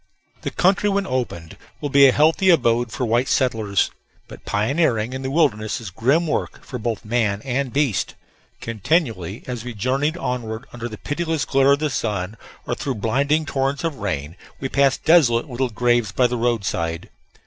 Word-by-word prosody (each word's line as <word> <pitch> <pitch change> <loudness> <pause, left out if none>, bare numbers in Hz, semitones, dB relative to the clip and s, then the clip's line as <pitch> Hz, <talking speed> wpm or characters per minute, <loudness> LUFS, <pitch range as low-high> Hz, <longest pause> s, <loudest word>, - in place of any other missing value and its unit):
The - - -3
country 195 +3 +2
when 200 0 0
opened 120 -11 -4 0.2
will 145 0 -4
be 140 0 +7
a - - +5
healthy 160 +7 +3
abode 120 -7 +3
for 125 - -2
white 120 +3 +1
settlers. 110 -7 +1 0.4
But - - -13
pioneering 115 +1 +1
in 130 - -4
the 130 - -3
wilderness 125 -7 +1
is 110 -5 -8
grim 135 - +2
work 155 - -3
for 125 - -6
both 115 -2 -3
man 105 -3 0
and 135 0 -1
beast. 140 -7 0 0.5
Continually, 115 - -1
as 125 -3 -5
we 120 -2 -7
journeyed 135 - 0
onward, 120 -7 -4
under 120 0 -5
the 110 - -8
pitiless 160 0 -2
glare 135 0 +4
of - - +2
the 150 0 -1
sun 105 -4 -2 0.3
or - - -2
through 135 -3 -3
blinding 140 +8 +1
torrents 135 0 -1
of 165 -4 -2
rain, 80 - -3 0.2
we 135 - -3
passed 140 -1 +2
desolate 140 -9 +4
little 130 -1 -2
graves 120 -2 +1
by 125 +5 +2
the 125 0 +1
roadside. 100 -9 -1
125 Hz, 175 wpm, -22 LUFS, 110-140 Hz, 0.5 s, be